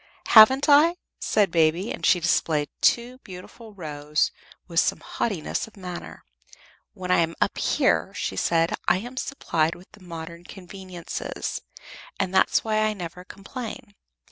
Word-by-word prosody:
"Haven't 260 +6 +8
I?" 305 +4 +6 0.2
said 205 -5 +1
Baby, 165 +4 +2
and - - -7
she 180 - +4
displayed 160 -3 +1
two 245 +2 +2
beautiful 205 +2 -12
rows 150 -3 -1 0.4
with 165 -1 +1
some - - +1
haughtiness 200 -5 -3
of 220 - -18
manner. 180 -2 -8 0.7
"When 180 -2 -4
I 180 - +5
am 165 0 0
up - - +1
here," - - +1
she - - -3
said, 165 - +1
"I - - +4
am 245 +6 -7
supplied 165 - -1
with 180 +2 -17
the 210 - -18
modern 170 -1 -8
conveniences, 185 -2 -6 0.6
and 190 -1 -1
that's 190 - +3
why 215 -1 0
I 215 0 +1
never 180 -2 -8
complain. 225 +3 -8
185 Hz, 145 wpm, -25 LUFS, 170-215 Hz, 0.7 s, Haven't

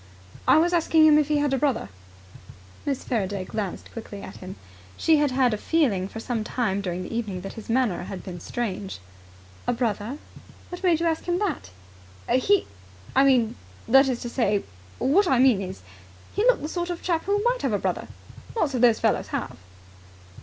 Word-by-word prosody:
"I - - +7
was 345 +3 +3
asking 325 -2 +4
him 305 -1 +7
if 300 - +1
he 300 -1 +2
had 290 -1 +1
a 270 - +1
brother." 275 - 0 1.0
Miss 275 -2 -1
Faraday 200 -5 -2
glanced 200 -2 -5
quickly 205 -3 -8
at 190 - -9
him. 185 +1 -8 0.4
She 320 -1 +4
had 295 -1 +2
had 255 -2 +2
a - - -1
feeling 215 - +1
for 225 - -8
some 230 -1 -2
time 215 -4 -1
during 180 -1 -3
the 225 - -6
evening 205 -6 -3
that 195 - -7
his 220 - -10
manner 230 -7 +1
had 190 -1 -7
been 175 -2 -7
strange. 200 -1 -4 0.7
"A 245 - +2
brother? 235 +1 -2 0.5
What 355 - -7
made 345 -4 +2
you - - +1
ask 325 -1 0
him 350 0 0
that?" 365 - -2 0.6
"He 370 +11 +3 0.5
I 270 - +6
mean 255 -5 +3 0.3
that 270 +3 +6
is 250 -2 -1
to 240 - -4
say 210 -5 +1 0.3
what 360 +9 +3
I 265 - +3
mean 250 -5 +5
is, 185 - -7 0.5
he 410 - 0
looked - - +4
the - - -2
sort 345 +2 -3
of 350 -1 -5
chap 335 -3 0
who 405 +1 +1
might - - +1
have - - 0
a - - +3
brother. - - -2 0.5
Lots 325 -11 0
of 250 - 0
those 235 -3 +5
fellows - - +1
have!" - - -4
255 Hz, 195 wpm, -25 LUFS, 205-315 Hz, 1.0 s, I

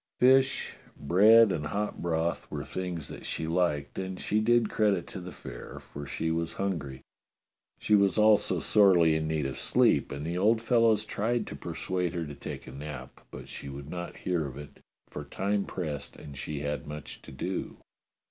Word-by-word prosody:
Fish, 130 +1 +4 0.2
bread, 105 +8 +6
and 75 -4 -2
hot 105 +5 -3
broth 85 0 -1
were - - -5
things 90 -5 -4
that - - -9
she 80 - -3
liked, 80 -4 0
and 95 -1 -4
she 105 - +1
did 120 +1 +3
credit 105 -5 +1
to 95 - -8
the 90 +1 -8
fare, - - -9
for 70 0 -9
she 80 +3 -2
was 80 0 -1
hungry. 80 -10 -3 0.8
She 105 - 0
was 100 -2 +4
also 105 -1 +4
sorely 90 -6 +5
in 80 0 -1
need 80 -2 -1
of 65 - -4
sleep, - - +3
and 70 +2 -5
the 85 +2 -2
old 110 +4 +4
fellows 115 -2 +3
tried 110 +2 -1
to - - -7
persuade 90 +1 -3
her 85 -2 -2
to 75 - -7
take - - -7
a - - -9
nap, 65 -2 -9
but - - -9
she 70 - -7
would 70 +1 -8
not 85 -1 -6
hear 85 -5 -1
of 65 0 -9
it, 75 0 -10 0.3
for - - -7
time 100 0 -1
pressed 75 -6 -4
and 70 -2 -10
she 70 +2 -4
had 70 -2 -3
much 75 0 -8
to - - -12
do. 90 +8 -4
85 Hz, 185 wpm, -29 LUFS, 75-105 Hz, 0.8 s, bread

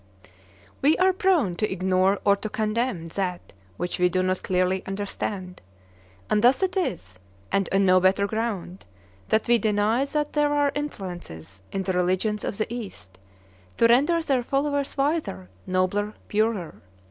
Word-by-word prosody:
We 295 +3 +4
are 375 0 +4
prone 355 - +2
to 215 - -1
ignore 190 +1 +2
or 200 - +5
to 215 +2 -5
condemn 215 -5 -1
that 180 0 -4 0.2
which 180 - -3
we 180 0 +4
do 185 +1 0
not 185 0 0
clearly 185 0 +1
understand; 195 -2 -4 0.7
and 210 +1 +1
thus 255 +9 +4
it 375 0 0
is, 165 - -3 0.3
and 195 -1 +1
on 195 0 +3
no 185 0 +6
better 190 +2 +3
ground, 200 -4 -3 0.5
that 220 - +2
we 240 0 +4
deny 215 +4 +1
that 295 +1 -2
there 295 -1 +2
are 290 -1 +2
influences 175 - -7
in 195 - -2
the 190 - -1
religions 185 +4 0
of 200 - -3
the 220 +2 -2
East 95 - -8 0.6
to - - +4
render 275 +9 +4
their 270 -5 +1
followers 280 +3 -1
wiser, 275 - -1 0.2
nobler, 185 +3 0
purer. 210 -5 -1
205 Hz, 155 wpm, -25 LUFS, 185-250 Hz, 0.7 s, no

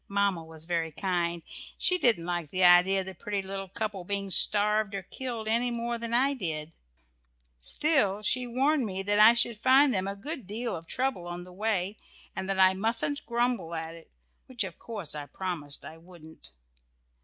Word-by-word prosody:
Mamma 200 -4 0
was 160 -1 -10
very 165 -2 -2
kind 170 -1 -2 0.3
she 365 -1 +3
didn't 230 - +3
like 175 -3 -3
the 185 +3 -1
idea 180 +2 +6
of - - -7
the 190 - -7
pretty 200 0 -4
little 195 0 -6
couple 205 -1 -4
being 200 +1 -3
starved 210 +1 +3
or 195 - -4
killed 235 +1 -6
any 235 +3 +2
more 235 0 -3
than 230 0 -4
I 265 +4 +3
did, 160 - -3 0.9
still 210 - +2
she 250 +3 0
warned 270 +4 +1
me 195 -3 -3
that 205 +1 +1
I 220 +2 +8
should 235 -2 +2
find 265 +2 +5
them 190 -1 -1
a 200 - -3
good 260 - -5
deal 230 +3 -3
of 165 0 -9
trouble 255 -8 -2
on 175 0 -6
the 180 0 -13
way, 205 0 -1 0.4
and 190 0 -4
that 195 - -1
I 190 0 +6
mustn't 225 +8 0
grumble 235 -8 -1
at 160 0 -4
it, 165 -1 -14 0.4
which, 245 -4 -1
of 185 -3 -8
course, 205 -10 -3
I 145 -1 -5
promised 155 -3 -5
I 160 - -10
wouldn't. 165 -2 -13
195 Hz, 190 wpm, -28 LUFS, 175-235 Hz, 0.9 s, I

